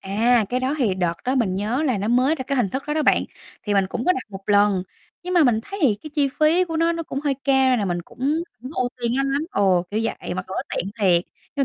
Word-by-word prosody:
À, 220 Hz, +4 st, +2 dB
cái 250 Hz, +1 st, -1 dB
đó 265 Hz, +3 st, 0 dB
thì 215 Hz, -8 st, +1 dB
đợt 175 Hz, -2 st, 0 dB
đó 255 Hz, +2 st, 0 dB
mình 215 Hz, -8 st, +1 dB
nhớ 220 Hz, +9 st, -1 dB
là 255 Hz, -9 st, +1 dB
nó 205 Hz, +3 st, -2 dB
mới 255 Hz, +6 st, +3 dB
ra 265 Hz, -, -5 dB
cái 275 Hz, -, -1 dB
hình 240 Hz, -6 st, +2 dB
thức 265 Hz, -, -3 dB
đó 295 Hz, -, -1 dB
đó 310 Hz, -, +1 dB
bạn, -, -, +3 dB, 0.4 s
thì 205 Hz, -1 st, -1 dB
mình 195 Hz, -1 st, +3 dB
cũng 235 Hz, -, -4 dB
có 365 Hz, -, +4 dB
đặt 260 Hz, -, -3 dB
một 195 Hz, 0 st, -8 dB
lần. 205 Hz, -2 st, +3 dB, 0.4 s
Nhưng 365 Hz, 0 st, -3 dB
mà 335 Hz, -4 st, +5 dB
mình 225 Hz, -3 st, +3 dB
thấy 395 Hz, 0 st, -7 dB
thì 240 Hz, -8 st, +4 dB
cái 310 Hz, -, -8 dB
chi 285 Hz, -2 st, +2 dB
phí 330 Hz, +4 st, +4 dB
của 325 Hz, -2 st, -4 dB
nó, 335 Hz, +1 st, +2 dB
nó 335 Hz, 0 st, -3 dB
cũng 275 Hz, -3 st, -5 dB
hơi 285 Hz, -2 st, 0 dB
cao 265 Hz, -1 st, +4 dB
nên 250 Hz, -, +3 dB
là 205 Hz, -, 0 dB
mình 175 Hz, -2 st, -2 dB
cũng -, -, -19 dB, 0.4 s
hổng 255 Hz, -, -7 dB
ưu 250 Hz, -1 st, +1 dB
tiên 235 Hz, 0 st, 0 dB
nó 275 Hz, -, +2 dB
lắm 275 Hz, +2 st, 0 dB
ồ, 190 Hz, -3 st, +2 dB
kiểu 215 Hz, -, -1 dB
vậy, 225 Hz, -, -4 dB
mặc 185 Hz, 0 st, -4 dB
dù -, -, -7 dB
nó -, -, -1 dB
tiện 195 Hz, -, -2 dB
thiệt. 180 Hz, -4 st, +3 dB, 0.3 s
Nhưng 275 Hz, -, +2 dB
245 Hz, 295 wpm, -22 LUFS, 200-280 Hz, 0.4 s, mà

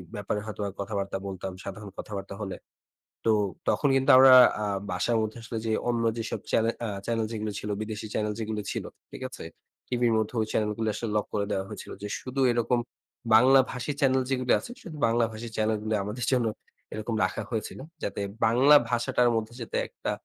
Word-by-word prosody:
ব্যাপারে 105 Hz, 0 st, -2 dB
হয়তোবা 105 Hz, -2 st, -4 dB
কথাবার্তা 100 Hz, -1 st, -2 dB
বলতাম, 95 Hz, 0 st, -5 dB
সাধারণ 100 Hz, +1 st, -7 dB
কথাবার্তা 100 Hz, -1 st, -6 dB
হলে। 95 Hz, -3 st, -4 dB, 0.7 s
তো 115 Hz, -, +5 dB, 0.4 s
তখন 145 Hz, -, +2 dB
কিন্তু 135 Hz, 0 st, +2 dB
আমরা 130 Hz, 0 st, +9 dB, 0.3 s
আ -, -, 0 dB, 0.3 s
বাসার 115 Hz, +6 st, +1 dB
মধ্যে 110 Hz, +2 st, -3 dB
আসলে 115 Hz, 0 st, -5 dB
যে 110 Hz, -, 0 dB, 0.2 s
অন্য 120 Hz, -1 st, +1 dB
যেসব 115 Hz, -1 st, -3 dB
চ্যানে 115 Hz, 0 st, +3 dB
অ্যা 115 Hz, -, -2 dB, 0.2 s
চ্যানেল 115 Hz, -1 st, 0 dB
যেগুলি 110 Hz, -2 st, -3 dB
ছিল, 105 Hz, -, -6 dB
বিদেশী 110 Hz, 0 st, -5 dB
চ্যানেল 105 Hz, -1 st, 0 dB
যেগুলি 110 Hz, -1 st, -2 dB
ছিল, -, -, -3 dB, 0.3 s
ঠিক -, -, -9 dB
আছে? -, -, -9 dB, 0.4 s
টিভির 120 Hz, -2 st, +2 dB
মধ্যে 110 Hz, +2 st, -1 dB
ওই -, -, +1 dB
চ্যানেল 105 Hz, -1 st, +1 dB
গুলি 110 Hz, -1 st, 0 dB
আসলে 115 Hz, -, -4 dB
লক 105 Hz, -, 0 dB
করে 100 Hz, -1 st, 0 dB
দেওয়া 95 Hz, -1 st, -1 dB
হয়েছিল। -, -, -8 dB
যে 105 Hz, -, -4 dB
শুদু 130 Hz, +1 st, -3 dB
এরকম 120 Hz, +1 st, +1 dB, 0.6 s
বাংলা 130 Hz, +4 st, +7 dB
ভাষী 125 Hz, +3 st, -3 dB
চ্যানেল 130 Hz, -1 st, +3 dB
যেগুলি 130 Hz, -2 st, +2 dB
আছে, -, -, -9 dB
শুধু 160 Hz, -4 st, -8 dB
বাংলাভাষী 115 Hz, 0 st, 0 dB
চ্যানেল 110 Hz, 0 st, +1 dB
গুলি 110 Hz, 0 st, 0 dB
আমাদের 110 Hz, +4 st, -3 dB
জন্য 125 Hz, -3 st, +2 dB, 0.5 s
এরকম 110 Hz, +1 st, -3 dB
রাখা -, -, -1 dB
হয়েছিল। 110 Hz, -3 st, -4 dB, 0.2 s
যাতে 100 Hz, -, -3 dB, 0.2 s
বাংলা 130 Hz, +6 st, +6 dB
ভাষাটার 120 Hz, 0 st, +2 dB
মধ্যে 110 Hz, +1 st, -2 dB
যাতে 115 Hz, -, -3 dB
একটা -, -, -4 dB
110 Hz, 185 wpm, -27 LUFS, 105-120 Hz, 0.7 s, আমরা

